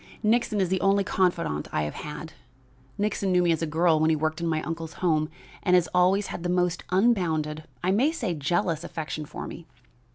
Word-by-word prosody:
"Nixon 220 Hz, -1 st, +2 dB
is 185 Hz, -3 st, +1 dB
the 190 Hz, 0 st, 0 dB
only 195 Hz, 0 st, +3 dB
confidant 175 Hz, -, 0 dB
I 75 Hz, -, 0 dB
have 75 Hz, -, -3 dB
had. 155 Hz, +1 st, -7 dB, 0.6 s
Nixon 200 Hz, -2 st, 0 dB
knew 180 Hz, 0 st, +4 dB
me 175 Hz, -, +3 dB
as 165 Hz, -, 0 dB
a 165 Hz, -, 0 dB
girl 160 Hz, +1 st, +3 dB
when 155 Hz, +1 st, +3 dB
he 160 Hz, -, +3 dB
worked 155 Hz, +2 st, -1 dB
in 170 Hz, -, -1 dB
my 155 Hz, -1 st, 0 dB
uncle's 165 Hz, +1 st, -5 dB
home, 155 Hz, -3 st, +1 dB, 0.3 s
and 180 Hz, -2 st, +3 dB
has 175 Hz, -2 st, +4 dB
always 185 Hz, +3 st, +3 dB
had -, -, -6 dB
the 175 Hz, -, -2 dB
most 180 Hz, -1 st, +1 dB
unbounded, 165 Hz, -7 st, +1 dB, 0.2 s
I 185 Hz, -, +2 dB
may 250 Hz, +10 st, +3 dB
say 320 Hz, -, -2 dB
jealous, 165 Hz, +2 st, 0 dB
affection 155 Hz, -2 st, -5 dB
for -, -, -7 dB
me. 170 Hz, -, -9 dB
175 Hz, 205 wpm, -26 LUFS, 155-190 Hz, 0.6 s, knew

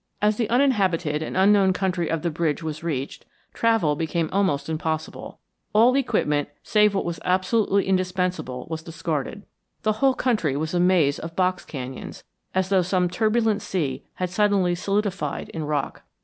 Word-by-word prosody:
As 210 Hz, 0 st, +2 dB
the 230 Hz, -3 st, -1 dB
uninhabited 190 Hz, -, +2 dB
and 160 Hz, -, -4 dB
unknown 195 Hz, 0 st, +5 dB
country 185 Hz, -3 st, -1 dB
of 165 Hz, -1 st, -1 dB
the 170 Hz, -, 0 dB
bridge 160 Hz, 0 st, -1 dB
was 155 Hz, 0 st, -4 dB
reached, 140 Hz, -5 st, -3 dB, 0.3 s
travel 225 Hz, -10 st, +2 dB
became 160 Hz, +1 st, -1 dB
almost 180 Hz, -8 st, +1 dB
impossible. 160 Hz, 0 st, -4 dB, 0.4 s
All 230 Hz, +4 st, +5 dB
equipment, 150 Hz, -, +1 dB
save 210 Hz, -1 st, +3 dB
what 195 Hz, -, 0 dB
was 170 Hz, -2 st, -3 dB
absolutely 195 Hz, +2 st, +2 dB
indispensable, 180 Hz, -8 st, -1 dB
was 160 Hz, -1 st, -4 dB
discarded. 160 Hz, +2 st, -4 dB, 0.4 s
The 215 Hz, -, +3 dB
whole 270 Hz, -1 st, +4 dB
country 210 Hz, -, 0 dB
was 155 Hz, +3 st, -3 dB
a 175 Hz, -, +1 dB
maze 175 Hz, -6 st, +3 dB
of 165 Hz, 0 st, -7 dB
box 185 Hz, 0 st, +1 dB
canyons, 130 Hz, -2 st, -7 dB, 0.3 s
as 190 Hz, 0 st, +1 dB
though 190 Hz, -2 st, +4 dB
some 180 Hz, 0 st, 0 dB
turbulent 220 Hz, 0 st, +1 dB
sea 145 Hz, -7 st, -2 dB
had 180 Hz, -1 st, -3 dB
suddenly 195 Hz, -2 st, +2 dB
solidified 195 Hz, -4 st, -2 dB
in 160 Hz, -2 st, -5 dB
rock. 145 Hz, -2 st, -2 dB
180 Hz, 160 wpm, -24 LUFS, 155-205 Hz, 0.4 s, unknown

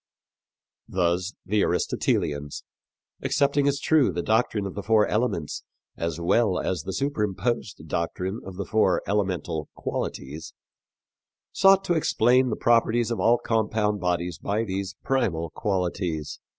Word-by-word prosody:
Thus 90 Hz, +2 st, 0 dB
the 105 Hz, +3 st, +1 dB
Aristotelians, 75 Hz, -1 st, -1 dB, 0.6 s
accepting 140 Hz, 0 st, +2 dB
as 140 Hz, 0 st, +1 dB
true 145 Hz, -6 st, +3 dB
the 85 Hz, 0 st, -3 dB
doctrine 110 Hz, -2 st, +1 dB
of 95 Hz, -, -5 dB
the 100 Hz, -, -5 dB
four 105 Hz, +1 st, +4 dB
elements 105 Hz, -9 st, -1 dB, 0.3 s
as 85 Hz, -1 st, -3 dB
well 95 Hz, +3 st, +2 dB
as 90 Hz, -4 st, -1 dB
the 95 Hz, -, -5 dB
superimposed 105 Hz, -, -2 dB
doctrine 90 Hz, +6 st, -3 dB
of 95 Hz, -1 st, -9 dB
the 100 Hz, +1 st, -4 dB
four 110 Hz, -4 st, +2 dB
elemental 90 Hz, -6 st, -1 dB
qualities, 75 Hz, +4 st, -5 dB, 1.0 s
sought 195 Hz, 0 st, +5 dB
to 175 Hz, -, +1 dB
explain 130 Hz, -5 st, +3 dB
the 110 Hz, -, -1 dB
properties 115 Hz, 0 st, +2 dB
of 115 Hz, -, -2 dB
all 120 Hz, +1 st, +4 dB
compound 110 Hz, -2 st, 0 dB
bodies 90 Hz, -2 st, -1 dB
by 105 Hz, +5 st, -1 dB
these 100 Hz, -1 st, -4 dB
primal 95 Hz, -12 st, 0 dB
qualities. 90 Hz, -6 st, -2 dB
100 Hz, 130 wpm, -25 LUFS, 90-115 Hz, 1.0 s, sought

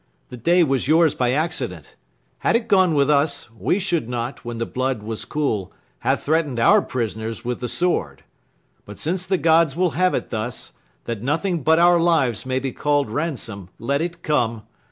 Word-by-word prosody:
The 125 Hz, -, -8 dB
day 170 Hz, +9 st, +3 dB
Was 135 Hz, -4 st, 0 dB
yours 160 Hz, 0 st, +4 dB
by 125 Hz, -1 st, 0 dB
accident; 130 Hz, -, -2 dB, 0.4 s
had -, -, +1 dB
it 230 Hz, -1 st, 0 dB
gone 185 Hz, -6 st, +4 dB
with 140 Hz, -1 st, +3 dB
us, 145 Hz, -2 st, +1 dB
We 115 Hz, -, 0 dB
should 170 Hz, -, -1 dB
not, 120 Hz, +1 st, -4 dB
when 120 Hz, -1 st, -5 dB
the 115 Hz, -, -2 dB
blood 130 Hz, -3 st, -2 dB
was 110 Hz, 0 st, -5 dB
cool, 110 Hz, -11 st, -2 dB, 0.3 s
have 130 Hz, +3 st, 0 dB
threaten'd 150 Hz, -5 st, 0 dB
Our 115 Hz, -, +5 dB
prisoners 110 Hz, -1 st, -4 dB
with 125 Hz, 0 st, -2 dB
the 125 Hz, -, -3 dB
sword. 85 Hz, -, -1 dB, 0.6 s
But 105 Hz, -, -11 dB
since 180 Hz, +3 st, -2 dB
the 190 Hz, -, +2 dB
gods 160 Hz, -2 st, +3 dB
Will 180 Hz, -1 st, +1 dB
have 185 Hz, +1 st, +1 dB
it -, -, -4 dB
thus, 115 Hz, +1 st, -4 dB, 0.3 s
that 115 Hz, -3 st, -4 dB
nothing 165 Hz, -, -1 dB
but 160 Hz, +4 st, +4 dB
our 175 Hz, 0 st, +5 dB
lives 135 Hz, -, +1 dB
May 130 Hz, 0 st, 0 dB
be 130 Hz, 0 st, -2 dB
call'd 145 Hz, -5 st, 0 dB
ransom, 115 Hz, -, -3 dB
let 140 Hz, +5 st, -1 dB
it 170 Hz, 0 st, -4 dB
come. 115 Hz, -7 st, 0 dB
140 Hz, 185 wpm, -22 LUFS, 115-165 Hz, 0.6 s, Our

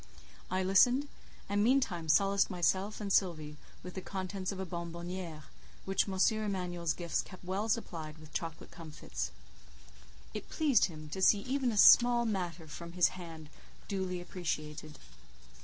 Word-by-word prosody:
I 185 Hz, +1 st, 0 dB
listened, 245 Hz, +9 st, +4 dB, 0.4 s
and 205 Hz, +1 st, +1 dB
meantime 215 Hz, -10 st, +1 dB
solaced 195 Hz, +5 st, +4 dB
myself 190 Hz, +3 st, 0 dB
and 200 Hz, -2 st, -2 dB
Sylvie 155 Hz, -5 st, +1 dB, 0.3 s
with 180 Hz, 0 st, -7 dB
the 190 Hz, -, -5 dB
contents 190 Hz, 0 st, -4 dB
of 195 Hz, -, -6 dB
a 190 Hz, -, -2 dB
bonbonnière, 170 Hz, -1 st, -6 dB, 0.4 s
which 195 Hz, +1 st, +1 dB
M. 190 Hz, -, -3 dB, 0.3 s
Emanuel's 175 Hz, -5 st, -2 dB
gifts 170 Hz, -2 st, -1 dB
kept 185 Hz, -2 st, -13 dB
well 195 Hz, +4 st, -2 dB
supplied 160 Hz, -8 st, -3 dB
with 155 Hz, -1 st, -14 dB
chocolate 165 Hz, -2 st, -5 dB
comfits: 150 Hz, -, -6 dB, 1.0 s
It -, -, -6 dB
pleased 295 Hz, -6 st, +3 dB
him 155 Hz, -3 st, -8 dB
to 190 Hz, +5 st, -5 dB
see 200 Hz, +1 st, +5 dB
even 260 Hz, +1 st, 0 dB
a 215 Hz, -, -3 dB
small 240 Hz, +3 st, +7 dB
matter 175 Hz, -6 st, -3 dB
from 170 Hz, +2 st, -8 dB
his 180 Hz, -1 st, +4 dB
hand 165 Hz, -4 st, -10 dB, 0.4 s
duly 190 Hz, -2 st, -2 dB
appreciated. 155 Hz, -4 st, -5 dB
185 Hz, 145 wpm, -32 LUFS, 165-200 Hz, 1.0 s, small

